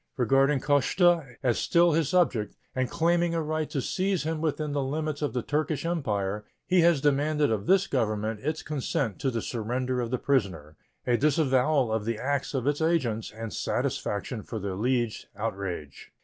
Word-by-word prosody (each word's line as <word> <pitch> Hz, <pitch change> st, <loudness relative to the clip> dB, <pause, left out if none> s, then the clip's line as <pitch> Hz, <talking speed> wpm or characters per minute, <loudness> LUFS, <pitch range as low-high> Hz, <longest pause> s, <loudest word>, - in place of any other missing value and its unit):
Regarding 135 Hz, +3 st, +3 dB
Koszta 145 Hz, +1 st, +2 dB
as 120 Hz, -3 st, +2 dB
still 170 Hz, 0 st, +4 dB
his 160 Hz, -2 st, +1 dB
subject, 130 Hz, -12 st, +1 dB, 0.2 s
and 130 Hz, -1 st, -1 dB
claiming 170 Hz, 0 st, +1 dB
a 165 Hz, -, +1 dB
right 155 Hz, 0 st, -2 dB
to 135 Hz, -, -2 dB
seize 190 Hz, -2 st, 0 dB
him 160 Hz, 0 st, -2 dB
within 155 Hz, -1 st, -1 dB
the 145 Hz, 0 st, 0 dB
limits 150 Hz, +2 st, -2 dB
of 145 Hz, -, -1 dB
the 125 Hz, -2 st, -1 dB
Turkish 150 Hz, +1 st, -1 dB
Empire, 105 Hz, -, -1 dB, 0.2 s
he 180 Hz, -1 st, +3 dB
has 170 Hz, -4 st, +4 dB
demanded 145 Hz, 0 st, +2 dB
of 105 Hz, -2 st, -2 dB
this 195 Hz, 0 st, +4 dB
Government 110 Hz, -, -1 dB
its 155 Hz, +6 st, -3 dB
consent 135 Hz, -6 st, -2 dB
to 135 Hz, -, 0 dB
the 115 Hz, -3 st, -3 dB
surrender 125 Hz, +2 st, -2 dB
of 120 Hz, -, -3 dB
the 125 Hz, -, 0 dB
prisoner, 95 Hz, -, -1 dB, 0.3 s
a 120 Hz, -1 st, +3 dB
disavowal 140 Hz, -3 st, +2 dB
of 110 Hz, -2 st, -1 dB
the 115 Hz, -1 st, -1 dB
acts 140 Hz, +3 st, -2 dB
of 130 Hz, -2 st, -1 dB
its 145 Hz, +2 st, 0 dB
agents, 130 Hz, -10 st, 0 dB
and 110 Hz, 0 st, -7 dB
satisfaction 105 Hz, +3 st, -2 dB
for 110 Hz, -, -6 dB
the 100 Hz, -2 st, -3 dB
alleged 120 Hz, +2 st, -1 dB
outrage. 95 Hz, -8 st, -5 dB
135 Hz, 175 wpm, -27 LUFS, 115-155 Hz, 0.3 s, still